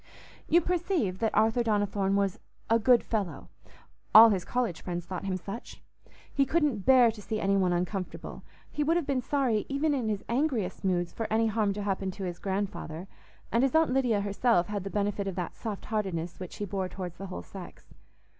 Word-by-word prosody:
You 345 - +5
perceive 345 - -1
that 225 - 0
Arthur 220 +3 +3
Donnithorne 205 -3 +1
was 200 +1 0 0.3
"a 230 - +5
good 245 +1 +5
fellow"—all 215 +3 +2
his 190 -3 0
college 245 -9 -2
friends 175 -1 -4
thought 185 +1 -5
him 190 -1 -1
such. 200 +5 -8 0.5
He 275 - +3
couldn't 275 - 0
bear 255 -3 +7
to 220 -1 -11
see 215 +1 -3
any 195 -1 +2
one 185 -2 +2
uncomfortable; 180 +2 -3 0.3
he 300 - -1
would 325 +3 +2
have 340 - -1
been 270 -2 0
sorry 250 -5 0
even 290 +2 +1
in 245 -6 -1
his 205 -2 -2
angriest 235 - -1
moods 175 -2 0
for 225 - -3
any 225 +1 +2
harm 215 -2 +1
to 205 +1 -4
happen 195 -1 -1
to 195 0 -7
his 175 -2 -4
grandfather; 190 -3 -4 0.4
and 230 - +3
his 270 +3 +1
Aunt 320 -4 +4
Lydia 245 -6 +2
herself 200 -1 +1
had 205 -2 -3
the 195 - -4
benefit 205 0 -1
of 190 - -3
that 180 -2 -4
soft 215 -4 -6
heartedness 185 -6 -3
which 180 -2 -7
he 205 - -4
bore 190 -1 -3
towards 180 -3 -7
the 195 - -6
whole 185 - -6
sex. 190 -3 -11
205 Hz, 195 wpm, -29 LUFS, 190-240 Hz, 0.5 s, bear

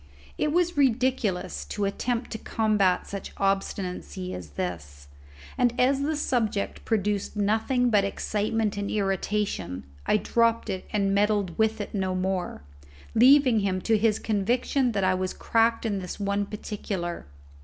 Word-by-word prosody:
It 300 - 0
was 345 0 +1
ridiculous 255 -7 +1
to 205 - -2
attempt 235 +4 -2
to 220 - -4
combat 210 -5 +1
such 200 -1 -7
obstinacy 195 -1 -2
as 85 -4 -7
this, 75 -6 -5 0.5
and 245 -1 +2
as 270 +2 +3
the 305 +2 0
subject 225 -8 -1
produced 210 -2 -1
nothing 225 +4 +1
but 205 -2 +4
excitement 210 +1 -1
and 200 0 -2
irritation, 195 - -1 0.2
I - - +4
dropped 230 +1 +1
it 185 - -5
and 200 -2 +1
meddled 205 -3 +1
with 220 0 +2
it 205 - -5
no 190 -2 -1
more, 185 - -2 0.5
leaving 255 0 +6
him 195 -2 0
to 225 - +2
his 215 0 +2
conviction 240 +4 0
that 200 -1 0
I 185 0 +3
was 185 0 -2
cracked 230 0 +2
in 205 -3 0
this 180 +1 -6
one 200 0 0
particular. 195 - -5
210 Hz, 145 wpm, -26 LUFS, 190-230 Hz, 0.5 s, leaving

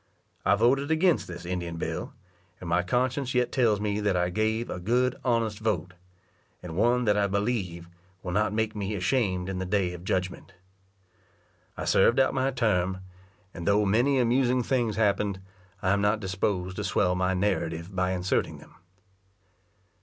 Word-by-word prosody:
I - - +4
voted 130 +7 +2
against 165 +2 +2
this 90 -1 -8
Indian 85 -2 -4
bill, - - -4 0.4
and 90 - -8
my 85 +2 +2
conscience 125 +7 -1
yet 125 -1 +2
tells 115 -6 +2
me 105 0 -1
that 100 -3 +1
I 90 0 0
gave 110 +4 0
a 90 - -5
good 125 +6 +1
honest 115 -4 0
vote, 110 -4 -2 0.7
and 85 -2 -7
one 120 +5 +2
that 105 -1 +3
I 100 -1 +2
believe 100 -4 -2 0.4
will 90 - -4
not 105 +2 +1
make 110 0 -1
me 105 0 -3
ashamed 95 -2 0
in 95 -1 -3
the - - -2
day 90 -2 0
of 90 0 -9
judgment. 95 0 -3 1.2
I - - -4
served 120 +6 +4
out 135 - +3
my 135 0 +1
term, 95 -7 0 0.5
and 85 - -7
though 105 +1 +3
many 120 +8 +3
amusing 125 0 +2
things 120 -4 0
happened, 100 -2 +1 0.4
I 95 - +2
am 100 0 +2
not 105 +2 +2
disposed 95 -1 -2
to - - -2
swell 90 -2 +1
my 90 +1 0
narrative 90 -2 -2
by 90 0 +1
inserting 90 +1 -1
them. - - -16
105 Hz, 170 wpm, -27 LUFS, 90-120 Hz, 1.2 s, I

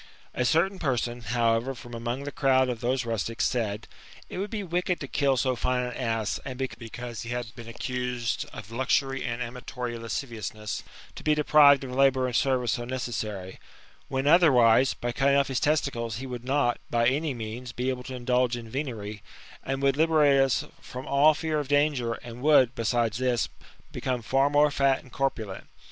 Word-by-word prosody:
A 125 - 0
certain 175 +9 +2
person, 120 -4 -1
however, 115 +3 +1
from 120 -1 -11
among 120 +3 -3
the 145 - -5
crowd 130 -2 +3
of 120 -2 -4
those 125 +1 0
rustics, 115 0 -1
said, 110 -4 -1 0.2
" - - -20
It - - -4
would 200 +2 -2
be 210 -1 -3
wicked 180 0 -1
to 140 - -5
kill 135 -1 +1
so 130 0 +1
fine 125 +1 0
an 125 0 -4
ass, 115 -4 -1
and 130 -2 -6
because 120 -2 -6
he 120 - -7
had 120 -1 -4
been 115 -1 -10
accused 125 0 -3
of 105 0 -10
luxury 135 +2 0
and 120 0 -2
amatory 125 0 -5
lasciviousness, 110 -2 -4 0.3
to - - -10
be 155 0 +3
deprived 145 -2 +6
of 130 - -6
>^tbour 135 0 +3
and 125 -2 -2
service 125 -3 +2
so 120 - -2
necessary; 110 -6 -4 0.5
when 135 0 -2
otherwise, 135 -6 +5
by 120 - -3
cutting 140 +2 +2
off 140 0 +2
his 130 -1 0
tes 150 +1 +3
ticles, 115 -5 -4
he 130 - -6
would 125 -2 -6
not, 130 -2 +1
by 115 0 +2
any 140 +2 0
means, 115 +2 -6
be 125 +2 -2
able 130 -1 -2
to 130 +1 -7
indulge 125 0 +1
in 115 -1 -8
venery, 110 -5 -5 0.5
would 135 0 +1
liberate 150 -3 +4
us 135 -2 +1 0.2
from 125 +1 -8
all 145 +3 +5
fear 160 -2 -1
of 145 - -4
danger, 145 -5 +2
and 120 0 -9
would, 135 -4 +5
besides 115 -1 0
this, 125 -3 +1 0.4
become 125 -2 -3
far 135 +5 +2
more 145 0 +4
fat 135 -1 +2
and 130 - -17
corpulent. 115 -8 -3
125 Hz, 190 wpm, -27 LUFS, 120-140 Hz, 0.5 s, deprived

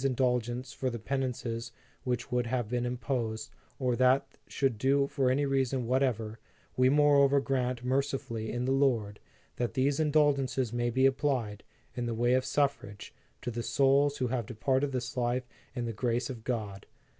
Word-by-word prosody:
indulgence 125 -1 0
for 130 - -2
the 120 - -4
penances 120 -2 -3 0.3
which 125 -1 -2
would 125 -1 0
have 120 -2 -1
been 120 +1 -1
imposed 120 -3 -3 0.3
or 125 -2 0
that 130 +2 +3
they - - -27
should 135 -6 -1
do 140 +3 +3
for 135 -2 0
any 140 +3 +2
reason 135 -2 0
whatever; 115 -4 0 0.4
we 130 0 +4
moreover 140 -1 +5
grant 125 -3 -1
mercifully 130 -4 -1
in 120 +1 -2
the 130 - 0
Lord, 120 -7 +1 0.4
that 120 +1 -2
these 140 +2 +1
indulgences 140 -5 +2
may 120 0 0
be 130 +3 +2
applied, 130 -6 0 0.3
in 120 -1 -3
the 115 - -2
way 120 +2 +2
of 130 0 +2
suffrage, 140 -8 -1 0.3
to 120 - -2
the 120 +1 -3
souls 140 +3 +3
who 130 - 0
have 120 -4 -2
departed 130 +4 0
this 125 +1 -4
life 125 0 -1 0.3
in 120 -2 -2
the 115 - -3
grace 120 +3 -1
of 115 -4 -9
God. 105 -6 -4
125 Hz, 170 wpm, -30 LUFS, 120-135 Hz, 0.4 s, moreover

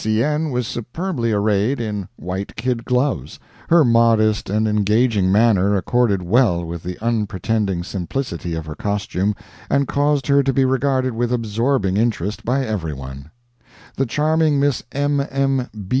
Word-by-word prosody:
C. 110 +1 +1
N. 150 +1 0
was 125 -2 -1
superbly 120 - -3
arrayed 105 +4 +1
in 105 -5 -3
white 95 +3 -5
kid 120 0 -2
gloves. 125 - -1 0.3
Her 165 -3 +6
modest 115 -3 +3
and 110 +2 +1
engaging 105 -1 +2
manner 100 -2 +3
accorded 100 -1 +1
well 90 -3 +2
with 85 0 -6
the 90 +1 -6
unpretending 105 -4 -1
simplicity 90 -2 -4
of 80 -1 -5
her 75 - -6
costume 100 +2 -2 0.3
and 140 -1 +2
caused 145 -1 +1
her 140 0 +4
to 135 0 +1
be 135 0 +2
regarded 130 -1 +1
with 120 +1 -1
absorbing 115 -3 0
interest 105 -3 -1
by 130 +3 0
every 95 -9 -3
one. 65 +1 -9 0.7
The 135 - 0
charming 155 +2 +2
Miss 140 -2 +1
M. 145 +1 0
M. 135 -2 0
115 Hz, 150 wpm, -20 LUFS, 100-135 Hz, 0.7 s, Her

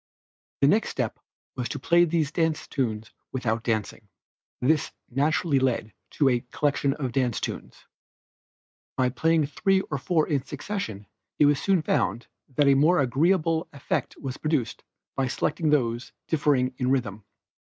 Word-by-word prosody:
The - - +6
next - - +3
step - - -3 0.4
was 125 -1 -3
to - - -4
play 170 +5 +4
these 160 -3 0
dance 160 -2 0
tunes 110 -5 -3 0.2
without 115 -3 -1
dancing. 110 -2 -2 0.5
This 150 +3 +1 0.2
naturally 145 +2 +2
led 120 -5 0 0.2
to 145 - +4
a 125 -2 +3
collection 140 0 0
of 135 -5 -3
dance 125 -2 0
tunes. - - -6 1.1
By 130 -1 +3
playing 160 +4 +2
three 190 +7 +1
or 140 - -1
four 160 +1 +1
in 140 -4 0
succession 140 - -5 0.3
it 150 - +5
was 145 -1 +3
soon 190 -5 +2
found 120 -6 0 0.3
that 145 +1 +4
a 140 - +7
more 155 +6 +4
agreeable 160 +5 +2
effect 140 - -3
was 135 -2 -5
produced 150 -6 -1 0.3
by 135 -1 0
selecting 155 +5 -1
those 120 -4 0
differing 140 -5 +2
in 125 -1 +1
rhythm. 115 -6 -1
140 Hz, 150 wpm, -26 LUFS, 125-155 Hz, 1.1 s, a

